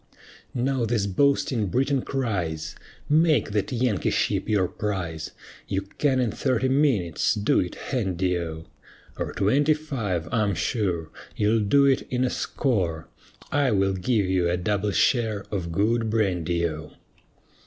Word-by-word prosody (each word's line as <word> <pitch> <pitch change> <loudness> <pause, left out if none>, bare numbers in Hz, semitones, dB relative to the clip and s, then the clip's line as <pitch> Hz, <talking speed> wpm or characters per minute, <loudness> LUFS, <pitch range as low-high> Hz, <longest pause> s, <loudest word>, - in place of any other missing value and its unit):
Now 130 0 0
this 115 -3 0
boasting 120 +1 +1
Briton 135 - +1
cries, 90 - -3 0.3
"Make 155 -5 +3
that 100 -2 -1
Yankee 120 -5 0
ship - - 0
your 100 -4 +2
prize, 90 -8 -4 0.4
You 95 0 -1 0.2
can 135 -3 +2
in 120 -4 +1
thirty 130 +1 0
minutes 125 - +2
do 105 0 +2
it 90 - -2
handy 95 -7 -1
O, 80 -1 -6 0.5
Or - - -2
twenty 140 +10 +2
five, 110 - -3
I'm 105 -4 +1
sure 85 -4 -1 0.2
You'll 110 +2 +2
do 125 +7 +4
it 135 -1 +2
in 125 0 0
a 125 - +1
score, 90 - -1 0.4
I 145 -2 +2
will 95 -1 +2
give 105 +2 +1
you 90 -2 +1
a 90 - +1
double 105 +3 0
share 110 -1 +1
of 90 -5 -3
good 110 +5 +1
brandy 90 -6 0
O. 75 -1 -8
105 Hz, 145 wpm, -25 LUFS, 90-125 Hz, 0.5 s, do